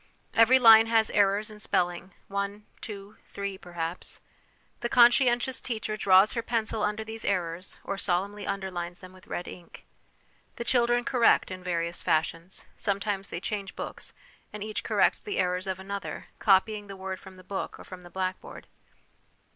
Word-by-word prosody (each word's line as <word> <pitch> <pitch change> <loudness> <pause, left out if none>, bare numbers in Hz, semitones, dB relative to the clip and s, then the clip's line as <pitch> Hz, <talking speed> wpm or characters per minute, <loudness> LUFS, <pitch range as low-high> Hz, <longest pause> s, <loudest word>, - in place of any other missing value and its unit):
Every 230 +3 +6
line 225 -2 +8
has 225 -1 +3
errors 205 +2 +2
in 210 - -11
spelling, 175 -2 -1
one, 200 +1 -3 0.2
two, 205 -1 -9
three, 200 -1 -5
perhaps. 175 -2 -6 0.6
The 240 - -2
conscientious 245 +1 +4
teacher 220 -3 -3
draws 195 0 +5
her 230 - -1
pencil 225 -1 -1
under 210 +1 -1
these 220 0 -7
errors, 180 -2 -2
or 195 0 -4
solemnly 200 +3 -1
underlines 180 -3 -4
them 185 0 -12
with 185 0 -18
red 175 - -4
ink. 175 -2 -12 0.7
The - - -4
children 240 0 +2
correct 245 -6 +3
in 185 0 -7
various 170 -1 -1
fashions; 165 +3 -1
sometimes 200 -1 -2
they 170 - -4
change 200 +1 -4
books, - - -7 0.4
and 210 -1 -6
each 215 0 -4
corrects - - +2
the 415 - -4
errors 180 +1 0
of 190 -1 -3
another, 200 +1 -6
copying 205 +1 +3
the 195 -1 -9
word 190 0 -5
from 190 -1 -13
the 185 - -14
book 190 +1 -5
or - - -10
from 185 -1 -10
the 175 - -13
blackboard. 185 +1 -5
200 Hz, 165 wpm, -28 LUFS, 185-220 Hz, 0.7 s, line